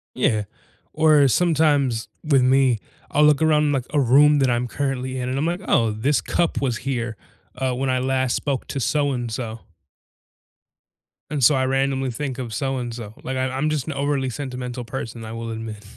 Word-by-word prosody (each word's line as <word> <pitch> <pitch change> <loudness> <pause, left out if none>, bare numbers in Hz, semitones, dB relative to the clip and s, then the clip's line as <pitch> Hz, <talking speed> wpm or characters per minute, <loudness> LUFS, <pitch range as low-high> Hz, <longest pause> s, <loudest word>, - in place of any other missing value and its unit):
Yeah. 110 -5 +1 0.5
Or 155 -3 +5
sometimes, 145 -6 +2 0.2
with 140 -4 +3
me, 130 -2 +3 0.3
I'll 150 +1 +4
look 150 -1 +4
around, 150 -2 +3
like, 130 -3 -1
a 150 - +3
room 145 +3 +5
that 135 -2 +3
I'm 120 0 0
currently 130 -1 -3
in, 125 0 -3
and 130 - -2
I'm 145 - 0
like, 175 +2 -1
"Oh, 115 -2 +3
this 120 +7 +1
cup 170 -2 0
was 125 -5 0
here, 120 -5 -3 0.4
uh, 130 0 -1
when 135 +1 -1
I 130 0 +1
last 130 -1 0
spoke 140 -3 -2
to 140 - -3
so-and-so" 120 -5 -1 1.7
and 145 -3 -2
so 140 +5 +6
I 130 0 +1
randomly 135 0 0
think 135 +1 -4
of 120 -4 -5
so-and-so. 120 -3 -4
Like, 130 0 -3
I 130 - 0
I'm 135 +4 -1
just 150 -4 -2
an 155 - -2
overly 140 -1 -1
sentimental 125 -2 -5
person, 115 -2 -6
I 110 - -7
will 115 0 -5
admit. 110 -2 -6
130 Hz, 180 wpm, -22 LUFS, 120-145 Hz, 1.7 s, so